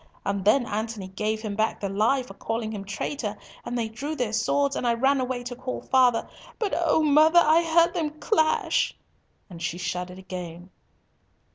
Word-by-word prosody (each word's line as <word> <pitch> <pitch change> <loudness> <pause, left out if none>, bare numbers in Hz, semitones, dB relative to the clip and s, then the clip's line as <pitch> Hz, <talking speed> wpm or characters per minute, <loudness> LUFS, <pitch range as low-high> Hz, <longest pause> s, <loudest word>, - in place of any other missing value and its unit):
And 200 -1 -1
then 240 +5 +4
Antony 215 -3 -4
gave 215 +3 -2
him 210 -2 -3
back 220 +1 0
the 200 - -2
lie 215 +7 +1
for 250 - -11
calling 225 -1 -3
him 205 -2 -5
traitor, 210 +2 -4 0.3
and 245 - -4
they 230 -2 -1
drew 280 +8 -5
their 245 -6 -2
swords, 280 +5 +1
and 245 - -1
I 235 - +3
ran 270 +3 +2
away 250 -1 -3
to 245 0 -6
call 255 +1 -5
father, 250 -3 +3 0.3
but 425 -4 -2
oh! 325 -2 +2
mother, 310 +3 +5
I 330 0 +6
heard 335 +1 +3
them 305 -4 -3
clash!" 315 -8 +1 0.5
and 170 -3 -11
she 170 0 -2
shuddered 180 0 -4
again. 180 -1 -8
235 Hz, 180 wpm, -26 LUFS, 205-285 Hz, 0.5 s, I